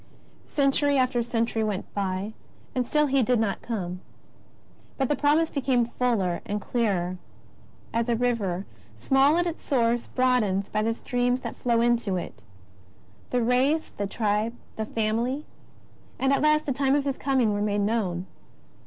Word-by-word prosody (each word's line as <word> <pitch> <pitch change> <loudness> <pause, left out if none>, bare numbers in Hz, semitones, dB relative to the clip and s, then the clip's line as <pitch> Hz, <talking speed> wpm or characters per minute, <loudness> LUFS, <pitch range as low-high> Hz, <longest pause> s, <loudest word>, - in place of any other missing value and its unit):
Century 280 0 +2
after 255 -2 +2
century 230 -1 0
went 210 -3 -3
by, 195 +1 -2 0.4
and 250 -2 -1
still 300 +2 +3
He 275 -1 +2
did 245 0 +2
not 220 -3 -1
come. 185 -6 -4 1.0
But 265 -2 0
the 295 - +2
Promise 300 +4 +2
became 255 -4 +1
fuller 205 -9 +1
and 210 -2 -3
clearer, 195 -6 -1 0.8
as 230 +1 0
a 235 - +3
river, 215 -6 -1 0.3
small 270 - +3
at 350 - +2
its 340 -1 -4
source, 240 -3 +1
broadens 220 -7 +1
by 215 - 0
the 225 +1 0
streams 245 +1 0
that - - -5
flow 235 -2 +1
into 235 -5 +2
it. 175 - -7 0.9
The 245 -1 +1
race, 265 +7 +2
the 205 - -1
tribe, 215 +2 0 0.2
the 220 0 -3
family, 230 +7 -1 0.7
and 270 +1 +2
at - - +2
last 305 0 +3
the 275 - 0
time 275 +1 +2
of 290 -1 +1
His 275 -1 -2
Coming, 260 -6 +2
were 205 - -1
made 205 0 +1
known. 200 -5 -1
235 Hz, 160 wpm, -26 LUFS, 210-270 Hz, 1.0 s, still